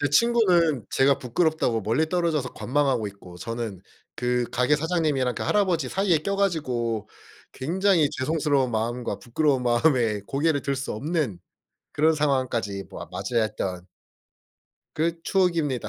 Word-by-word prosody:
제 145 - +1
친구는 175 - +3
제가 135 +1 +3
부끄럽다고 125 -2 0
멀리 120 +10 +1
떨어져서 165 -6 0
관망하고 130 -5 0
있고 95 -3 -13
저는 115 0 -5 0.3
그 125 0 0
가게 125 +4 +3
사장님이랑 150 -6 0
그 - - -4
할아버지 180 -9 +1
사이에 190 -1 +2
껴 200 +6 -2
가지고 125 - -1 0.4
굉장히 170 +3 +2
죄송스러운 140 -2 0
마음과 120 +2 -2
부끄러운 130 +1 0
마음에 120 -4 +2
고개를 145 0 0
들 140 -1 -1
수 135 +2 -4
없는 135 - -2 0.5
그런 160 +2 +3
상황까지 130 -9 -1
뭐 - - -8
맞이했던 95 -6 -2 1.1
그 165 +1 -1
추억입니다. 165 - +1
140 Hz, 330 characters per minute, -25 LUFS, 120-160 Hz, 1.1 s, 친구는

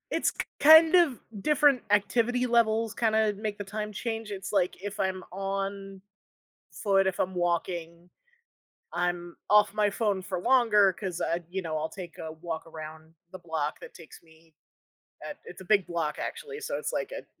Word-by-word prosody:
It's - - +1
k - - -4 0.2
kind 315 +2 +8
of 335 -9 +4 0.2
different 290 -1 +4
activity 230 +5 +2
levels 230 -2 +2
kinda 220 -2 +2
make 205 0 -4
the 205 - -4
time 210 +1 -5
change. 225 +1 -4
It's, 195 0 -5
like, 185 -3 0
if 205 +1 -6
I'm 190 -1 -1
on 195 0 -4 0.7
foot, 195 -2 +2
if 190 - -2
I'm 185 - 0
walking, 170 0 -2 0.8
I'm 175 0 -2
off 210 -1 +5
my 210 -1 +2
phone 205 -2 0
for 185 0 -4
longer 210 -4 +4
'cause 185 -2 -5
I, 170 +1 -1
you 190 +2 -4
know, 160 -2 -3
I'll 155 +1 -2
take 180 -3 -10
a 160 - -6
walk 160 0 -6
around 160 0 -10 0.2
the 185 - -8
block 160 -3 -3
that - - -11
takes 165 -2 -14
me, 160 -1 -23 0.7
uh, - - -5
it's - - -11
a - - -10
big 200 -1 +3
block, 165 -3 -2
actually, 445 -2 -6
so, - - -3
it's - - -4
like - - -2
a - - -7
195 Hz, 175 wpm, -28 LUFS, 175-220 Hz, 0.8 s, kind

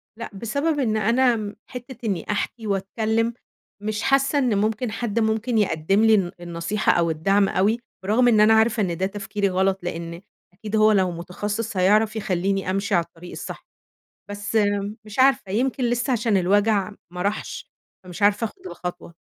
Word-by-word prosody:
لأ، 230 - -7
بسبب 280 +10 -1
إن 220 -5 +1
أنا 235 +3 +3
م 210 -2 -5
حتة 250 0 -9
إني 190 -6 -1
أحكي 220 +2 -3
واتكلم 220 +4 0 0.5
مش 210 0 -2
حاسة 275 +2 +2
إن 245 -7 +1
ممكن 215 +3 0
حد 230 0 -2
ممكن 220 +2 0
يقدّم 195 0 +2
لي 220 -1 +6
الن 185 -4 0
النصيحة 175 +4 -1
أو 170 -1 +2
الدعم 195 +5 +2
أوي، 210 +5 +1 0.2
برغم 220 +6 +3
إن 225 -3 +5
أنا 215 +1 +6
عارفة 220 0 +3
إن 175 -3 -2
ده 190 - 0
تفكيري 200 0 -2
غلط 190 +1 +1
لأن 170 0 -5 0.3
أكيد 210 +3 -5
هو 215 0 +5
لو 190 -3 +2
متخصص 205 +5 -4
هيعرف 210 +4 +3
يخلّيني 195 -2 -1
أمشي 195 +2 0
على 170 - +3
الطريق 170 +1 -13
الصح، - - -8 0.6
بس 205 +2 -2 0.5
مش 215 +3 -8
عارفة 260 -7 +3
يمكن 255 +5 0
لسه 240 +2 0
عشان 225 -3 +1
الوجع 205 +2 +2 0.2
ما 180 - -4
راحش، 200 +3 -3 0.3
فمش 180 +2 -10
عارفة 205 +2 +3
آخد 370 - -9
الخطوة. 180 - -7
210 Hz, 170 wpm, -23 LUFS, 190-225 Hz, 0.6 s, لي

